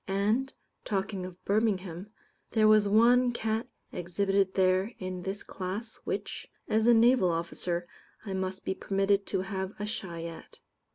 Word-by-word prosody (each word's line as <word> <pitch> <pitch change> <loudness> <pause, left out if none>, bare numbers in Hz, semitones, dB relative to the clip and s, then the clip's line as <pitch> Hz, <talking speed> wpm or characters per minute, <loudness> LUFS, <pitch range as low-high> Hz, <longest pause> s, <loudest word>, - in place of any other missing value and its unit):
And, 210 +7 +1 0.3
talking 195 -2 -2
of 180 0 -14
Birmingham, 200 -3 0 0.4
there 215 -2 +4
was 215 -1 +6
one 240 +4 +5
cat 220 0 -1 0.2
exhibited 195 +2 0
there 190 +3 +2
in 185 -1 -5
this 195 +2 -4
class, 200 +5 -5
which, - - -4 0.2
as 220 +1 +2
a 240 - +8
Naval 230 -4 +5
officer, 170 +1 -2 0.4
I 195 - -4
must 190 0 -3
be - - 0
permitted 195 +1 +1
to 190 - 0
have 190 0 -4
a 210 - -2
shy 180 -6 -5
at. 165 -1 -9
195 Hz, 150 wpm, -29 LUFS, 185-215 Hz, 0.4 s, a